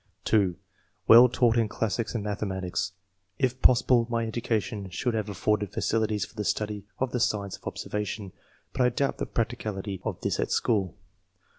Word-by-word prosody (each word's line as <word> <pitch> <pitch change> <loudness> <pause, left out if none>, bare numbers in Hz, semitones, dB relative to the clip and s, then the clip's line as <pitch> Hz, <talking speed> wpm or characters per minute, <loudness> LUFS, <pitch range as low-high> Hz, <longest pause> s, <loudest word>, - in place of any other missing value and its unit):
'' - - -40
(2) 95 -5 +3 0.3
" - - -42
Well 120 +2 +9
taught 120 -1 +3
in 115 -2 +2
classics 110 +2 -2
and 110 - -1
mathematics. 95 -3 -2 0.4
If 130 -1 0
possible 125 -1 +5
my 115 -1 0
education 110 -3 -2
should 115 +7 -1
have 110 -2 -2
afforded 105 +1 0
facilities 110 -2 0
for 105 - -18
the 105 - -3
study 105 -1 -2
of 130 -1 -1
the 125 - -1
science 105 -4 0
of - - -6
observa 105 0 -4
tion, 100 -4 -6 0.4
but 130 - -1
I 125 - +5
doubt 140 +2 -1
the - - -2
practicability 105 -4 -3
of - - -3
this - - -1
at - - 0
school. 100 -7 +1
110 Hz, 180 wpm, -27 LUFS, 100-120 Hz, 0.4 s, Well